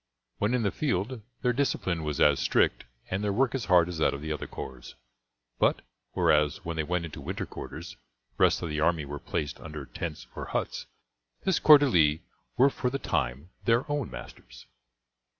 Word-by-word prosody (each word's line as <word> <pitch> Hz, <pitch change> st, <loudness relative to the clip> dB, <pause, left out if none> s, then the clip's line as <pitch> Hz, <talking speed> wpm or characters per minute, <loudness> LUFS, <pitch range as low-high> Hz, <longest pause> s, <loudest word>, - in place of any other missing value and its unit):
When 105 Hz, +5 st, +2 dB
in 120 Hz, -, 0 dB
the 100 Hz, -, +1 dB
field 120 Hz, -3 st, -1 dB, 0.2 s
their 125 Hz, -1 st, +3 dB
discipline 95 Hz, -10 st, 0 dB
was 75 Hz, -2 st, -3 dB
as 75 Hz, -2 st, +5 dB
strict -, -, +2 dB, 0.3 s
and 95 Hz, +2 st, -1 dB
their 105 Hz, -, +1 dB
work 125 Hz, +4 st, +2 dB
as 135 Hz, -4 st, -2 dB
hard 90 Hz, -3 st, +5 dB
as 90 Hz, -3 st, -5 dB
that 80 Hz, -, +2 dB
of 70 Hz, -, -8 dB
the 80 Hz, -, -3 dB
other 75 Hz, -, -5 dB
corps, 65 Hz, -2 st, -8 dB, 0.6 s
but, -, -, +2 dB, 0.3 s
whereas, 75 Hz, -1 st, +2 dB
when 85 Hz, 0 st, -3 dB
they 80 Hz, -, 0 dB
went 85 Hz, +2 st, -1 dB
into 80 Hz, -, -8 dB
winter -, -, -4 dB
quarters, -, -, -8 dB, 0.4 s
the -, -, -7 dB
rest -, -, +3 dB
of 85 Hz, -, -2 dB
the 75 Hz, 0 st, -2 dB
army 80 Hz, -1 st, +2 dB
were 70 Hz, +1 st, -6 dB
placed 75 Hz, +1 st, -3 dB
under 75 Hz, -3 st, -7 dB
tents 75 Hz, +5 st, -6 dB
or -, -, -5 dB
huts, -, -, -3 dB, 0.6 s
this 190 Hz, -3 st, +2 dB
corps 150 Hz, -1 st, +9 dB
d'elite 85 Hz, -, +3 dB, 0.3 s
were 135 Hz, +2 st, +6 dB
for 125 Hz, -, -1 dB
the 135 Hz, -, -2 dB
time 70 Hz, -, -2 dB
their 120 Hz, +3 st, +3 dB
own 145 Hz, -6 st, -1 dB
masters. -, -, -11 dB
85 Hz, 190 wpm, -28 LUFS, 75-120 Hz, 0.6 s, corps